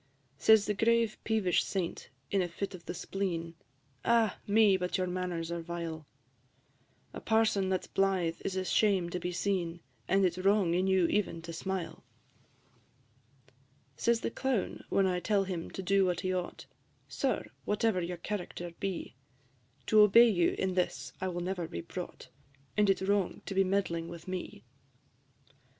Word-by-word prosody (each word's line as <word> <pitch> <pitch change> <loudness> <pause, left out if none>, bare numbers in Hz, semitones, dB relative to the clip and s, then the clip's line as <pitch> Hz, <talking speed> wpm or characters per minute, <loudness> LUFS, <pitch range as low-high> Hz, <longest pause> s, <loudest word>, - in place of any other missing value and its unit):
Says 220 -2 +6
the 210 - 0
grave 230 +1 +2
peevish 210 -6 +2
Saint, 185 -4 -3 0.2
in 195 - +2
a 180 - 0
fit 195 +4 -5
of 180 -2 -10
the - - -3
spleen, 170 -3 -3 0.5
"Ah! 230 -2 +2
me, 205 -1 +5
but 180 -1 -1
your 185 - 0
manners 180 -2 -3
are 170 0 -3
vile: 165 -2 -5 1.1
A - - -7
parson 220 -4 +2
that 185 -1 0
's - - -11
blythe 190 -4 0
is 190 - -2
a 185 0 -1
shame 190 -3 +2
to 180 - -2
be 180 - -3
seen, 175 -2 -1 0.3
And 195 0 +3
it 180 - +2
's - - -11
wrong 195 -2 +3
in 185 +2 +1
you 190 -2 +4
even 190 -2 0
to 165 0 -7
smile." 185 +1 -4 1.4
V. 130 - -28 0.4
Says 235 - +1
the - - -2
Clown, 260 -6 -2
when 195 - +3
I 180 -1 +1
tell 200 +1 +1
him 180 -3 -4
to 190 - -6
do 195 +1 +3
what 180 -2 0
he 185 0 -1
ought, 180 -1 -4 0.4
"Sir, - - -2
whatever 210 -2 +1
your 175 +1 -4
character 175 -2 -5
be, 195 -3 -3 0.7
To 215 - +4
obey 230 +3 +8
you 175 -4 +2
in 190 -1 0
this 145 -7 -2
I 190 - 0
will 175 -1 -3
never 180 -1 -3
be 85 - -5
brought, - - -8 0.5
And 210 -1 +3
it 195 - +4
's - - -3
wrong 200 -2 0
to - - -4
be 195 0 +4
meddling 185 -4 -1
with 170 +1 -10
me." 185 -1 -5
185 Hz, 175 wpm, -31 LUFS, 175-200 Hz, 1.4 s, obey